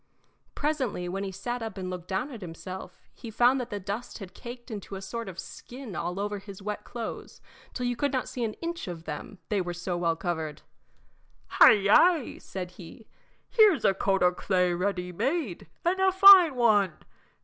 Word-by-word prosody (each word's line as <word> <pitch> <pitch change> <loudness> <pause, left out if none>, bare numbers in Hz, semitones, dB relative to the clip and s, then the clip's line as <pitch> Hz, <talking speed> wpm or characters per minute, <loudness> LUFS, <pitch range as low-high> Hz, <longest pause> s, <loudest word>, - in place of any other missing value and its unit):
Presently, 265 -12 -1
when 195 +2 -3
he 195 - -4
sat 240 +6 -4
up 220 -3 -6
and 185 -1 -4
looked 180 -1 -7
down 190 +9 -2
at 235 -5 -9
himself, 185 +2 -8
he 230 - -10
found 245 +4 +3
that 245 - -6
the 205 -3 -4
dust 200 +5 -5
had 195 -4 -10
caked 240 +1 -10
into 205 -2 -6
a - - -5
sort 230 +2 -5
of 180 - -10
skin 245 +2 -9
over 200 +4 -3
his 195 -1 -11
wet 210 +1 -5
clothes 235 -2 -7 0.4
till 250 - -2
you 245 0 0
could 285 +3 0
not 260 -2 -1
see 245 - -4
an 215 -2 -2
inch 335 -5 -4
of 170 -2 -6
them, 160 +6 -7
they 205 -3 +1
were 175 -1 -4
so 175 +1 -3
well 170 -1 0
covered. 160 -3 -4 0.9
"Hi, - - +8
yi!" 235 - +3
said 180 -2 -7
he, 180 +4 -13 0.4
"here's 425 - +4
a 195 - +5
coat 195 0 +1
o' 180 - +5
clay 180 -1 +1
ready 180 0 -2
made, 240 - -2 0.2
and 365 +2 +1
a 380 0 +4
fine 380 -5 +9
one. 210 -7 +3
205 Hz, 190 wpm, -28 LUFS, 180-245 Hz, 0.9 s, fine